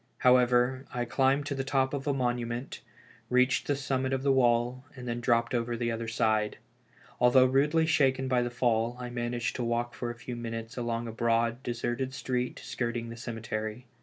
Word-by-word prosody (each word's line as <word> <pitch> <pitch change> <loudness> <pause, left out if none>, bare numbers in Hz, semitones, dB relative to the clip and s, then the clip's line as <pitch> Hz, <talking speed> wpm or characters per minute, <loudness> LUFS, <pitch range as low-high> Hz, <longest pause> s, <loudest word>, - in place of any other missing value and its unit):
However, 125 +1 +3
I 120 -1 -2
climbed 135 +3 +2
to 145 - -2
the 135 -1 -2
top 135 0 +1
of 140 0 -3
a - - +3
monument, 120 -1 -2 0.5
reached 125 +1 +3
the 145 - +2
summit 135 -1 -1
of 135 0 -1
the 140 - +3
wall, 125 -1 +2
and 125 -1 -8
then 120 0 -2
dropped 115 0 +2
over 120 0 -1
the 120 0 -1
other 115 0 -3
side. 110 -1 +1 0.6
Although 125 +1 +6
rudely 145 +5 +3
shaken 135 -4 +2
by 125 -1 +2
the 120 - -1
fall, 120 -1 0
I 125 -1 -5
managed 120 -1 -2
to 125 - -2
walk 120 0 -1
for 120 - -4
a 120 - -5
few 120 +1 -7
minutes 115 -1 -5
along 120 -1 -2
a - - -4
broad, 115 +1 +1
deserted 120 +2 -3
street 125 -1 -2
skirting 120 -1 -3
the 115 - -7
cemetery. 115 0 -5
120 Hz, 190 wpm, -29 LUFS, 115-130 Hz, 0.6 s, Although